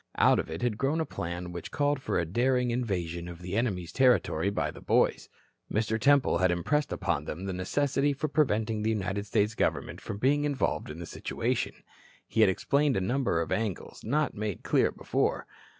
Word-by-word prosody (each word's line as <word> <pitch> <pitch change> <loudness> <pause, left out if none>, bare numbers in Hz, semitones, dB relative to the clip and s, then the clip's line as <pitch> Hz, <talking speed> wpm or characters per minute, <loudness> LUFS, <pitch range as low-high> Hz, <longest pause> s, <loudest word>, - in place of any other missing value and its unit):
Out - - +5
of - - -3
it 80 +5 -5
had 115 -3 0
grown 140 +4 +1
a 160 - 0
plan 90 - -5
which 85 -1 -6
called 145 -1 0
for - - -1
a 85 - +1
daring 125 +6 +1
invasion 90 -8 -2
of 85 -1 -8
the 90 +2 -5
enemy's 100 -7 -1
territory 125 -6 +3
by 100 - -1
the - - -12
boys. - - +2 0.4
Mr. 110 +1 0
Temple 140 -8 +4
had 95 0 +3
impressed 140 - 0
upon 85 -6 -1
them 90 +6 -5
the 95 - -3
necessity 140 +9 +1
for 140 +2 -2
preventing 110 -7 +1
the 110 - 0
United 100 -1 -2
States 105 +3 +1
government - - -1
from - - -5
being 140 +6 +2
involved 145 - -1
in 75 - -7
the 85 - -6
situation. - - -2 0.5
He 115 - +1
had 110 - +7
explained 140 +7 +1
a - - +2
number 115 -3 0
of 85 - -4
angles 100 0 -3
not 150 +6 0
made 105 -3 -4
clear - - +3
before. - - -1
110 Hz, 195 wpm, -29 LUFS, 90-135 Hz, 0.5 s, had